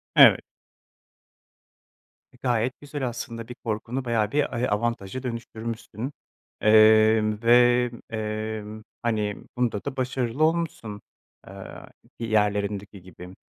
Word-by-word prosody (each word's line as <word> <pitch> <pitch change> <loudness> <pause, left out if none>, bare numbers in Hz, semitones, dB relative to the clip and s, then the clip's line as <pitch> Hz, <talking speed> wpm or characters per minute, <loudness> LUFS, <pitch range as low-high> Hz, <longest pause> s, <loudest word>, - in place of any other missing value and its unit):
Evet. - - +8 1.9
E, 125 - -21
gayet 120 0 +1
güzel 145 -2 -4
aslında, 115 -1 -6
bir 125 - -8
korkunu 115 +4 -3
bayağı 110 -3 0
bir 145 -2 0
ay 120 +2 0
avantaja 115 +2 -2
dönüştürmüşsün, 115 0 -5 0.5
eee, 110 0 +6 0.2
ve, 120 +1 +5 0.2
emm, 110 -1 -4 0.2
hani, 105 -3 -1 0.2
bunda 120 -5 -1
da 140 -1 -5
başarılı 130 +1 -1
olmuşsun, 155 -11 -1 0.5
eee, - - -10 0.7
diğerlerindeki 105 -3 -1
gibi. 90 +1 -12
115 Hz, 100 wpm, -25 LUFS, 105-125 Hz, 1.9 s, Evet